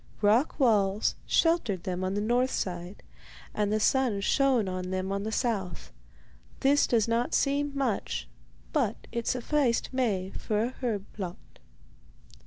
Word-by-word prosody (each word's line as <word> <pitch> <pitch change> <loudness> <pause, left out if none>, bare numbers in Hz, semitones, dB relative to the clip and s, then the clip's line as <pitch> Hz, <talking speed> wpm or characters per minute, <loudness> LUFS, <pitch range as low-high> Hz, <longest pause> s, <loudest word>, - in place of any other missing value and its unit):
Rock 230 +10 +3
walls 210 -5 +3
sheltered 245 - +2
them 185 0 -3
on 185 +1 -1
the 205 - 0
north 245 +4 +2
side, 180 -1 -4 0.5
and 210 -1 0
the 215 - +2
sun 245 -2 +2
shone 255 -1 +2
on 185 0 -3
them 185 +1 -2
on 200 0 -1
the 215 +2 -3
south. 220 -7 -2 0.7
This 285 +2 +4
does 230 -3 +2
not 230 +1 +1
seem 285 +1 +1
much, 265 -7 -1 0.5
but 250 -9 0
it 235 -1 -3
sufficed 255 0 +1
Maie 200 -8 0
for 215 0 -1
a 240 - 0
herb 215 -6 -1
plot. 185 -4 -5
220 Hz, 145 wpm, -28 LUFS, 195-255 Hz, 0.7 s, This